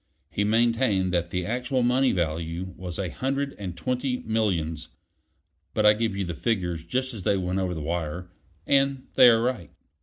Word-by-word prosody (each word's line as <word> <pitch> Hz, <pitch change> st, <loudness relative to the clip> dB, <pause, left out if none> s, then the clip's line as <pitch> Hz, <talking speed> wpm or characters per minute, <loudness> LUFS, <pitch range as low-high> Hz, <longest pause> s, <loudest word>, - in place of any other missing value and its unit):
He 100 Hz, -, 0 dB
maintained 110 Hz, -4 st, +2 dB
that 85 Hz, -1 st, 0 dB
the 90 Hz, 0 st, -2 dB
actual 125 Hz, +3 st, -1 dB
money 125 Hz, +2 st, +3 dB
value 85 Hz, +1 st, -2 dB
was 90 Hz, -2 st, -6 dB
a 95 Hz, -3 st, -2 dB
hundred 140 Hz, -, -2 dB
and 90 Hz, -4 st, -5 dB
twenty 125 Hz, +6 st, -1 dB
millions; 85 Hz, -8 st, -1 dB, 0.9 s
but 110 Hz, -, +2 dB
I 105 Hz, -, +8 dB
give 110 Hz, -2 st, -1 dB
you 100 Hz, -, -1 dB
the 85 Hz, -, -4 dB
figures 90 Hz, -6 st, -1 dB
just 130 Hz, +9 st, -2 dB
as 110 Hz, -, -7 dB
they 100 Hz, +2 st, +2 dB
went 90 Hz, 0 st, -1 dB
over 90 Hz, -2 st, -1 dB
the 80 Hz, -, -5 dB
wire, 85 Hz, +2 st, -3 dB, 0.3 s
and 135 Hz, -1 st, +2 dB
they 125 Hz, -, +8 dB
are 115 Hz, -1 st, +4 dB
right. 120 Hz, -, -2 dB
100 Hz, 180 wpm, -26 LUFS, 85-125 Hz, 0.9 s, I